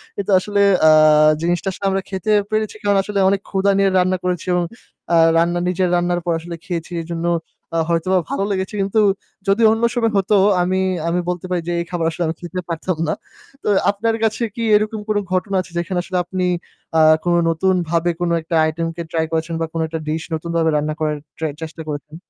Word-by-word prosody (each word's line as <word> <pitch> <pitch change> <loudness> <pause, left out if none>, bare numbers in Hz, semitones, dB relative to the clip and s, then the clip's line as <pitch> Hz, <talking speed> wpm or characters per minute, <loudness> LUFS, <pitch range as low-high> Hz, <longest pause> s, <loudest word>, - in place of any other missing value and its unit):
কিন্তু 200 0 -3
আসলে 205 +1 0 0.3
আ - - +8 0.5
জিনিসটা 175 +3 -1
আসলে 195 - -7
আমরা 195 0 0
খেতে 195 +2 -2 0.2
পেরেছি 215 0 -1
কারণ 205 -1 +3
আসলে 205 -1 -2
অনেক 200 0 0
ক্ষুধা 195 0 +2
নিয়ে 195 0 +3
রান্না 185 +1 +2
করেছি 180 -2 -2
এবং 175 -1 +2 0.5
আ - - +5 0.2
রান্না 175 +1 +2
নিজের 180 0 +1
রান্নার 175 0 0
পর 170 - +1
আসলে 170 +1 -7
খেয়েছি। 170 -1 -4
এজন্য 170 +1 -4 0.5
আ - - +2
হয়তোবা 175 +2 +2
ভালো 195 - -1
লেগেছে। 190 +1 -2
কিন্তু 200 +3 +1 0.5
যদি 195 +3 +2
অন্য 225 +1 -1
সময় 230 -2 +1
হতো 195 +2 +2 0.3
আমি, 185 +1 +1 0.3
আমি 175 +1 +1
বলতে 180 0 -3
পারি 180 -1 0
যে - - -1
এই - - -5
খাবার 170 -2 -1
আসলে 170 +2 -3
আমি 160 - -2
খেতে 180 +1 -5
পারতাম 170 +1 -2
না। - - +1 0.5
তো - - -5 0.2
আপনার 225 +3 0
কাছে 220 +2 0
কি 230 - -3
এরকম 215 +1 0
কোনো 210 -1 +2
ঘটনা 190 +2 0
আছে 175 -1 -13
যেখানে 175 +1 -1
আসলে 185 0 -3
আপনি 185 0 -2 0.5
আ - - +6 0.2
কোনো 175 0 +2
নতুনভাবে 175 -1 +1
কোনো 170 -1 +1
একটা 165 +1 -3
item 165 +1 -3
কে 170 - -5
try 160 -1 0
করেছেন 165 +1 -1
বা 165 - +1
কোনো 165 -1 -1
একটা 160 0 -4
dish 160 +1 -2
নতুনভাবে 165 0 0
রান্না 150 +1 -1
করার 150 -1 -1 0.2
try 160 -2 -2
চেষ্টা 160 0 -7
করেছেন? 150 +1 -6
175 Hz, 200 wpm, -19 LUFS, 165-195 Hz, 0.5 s, আ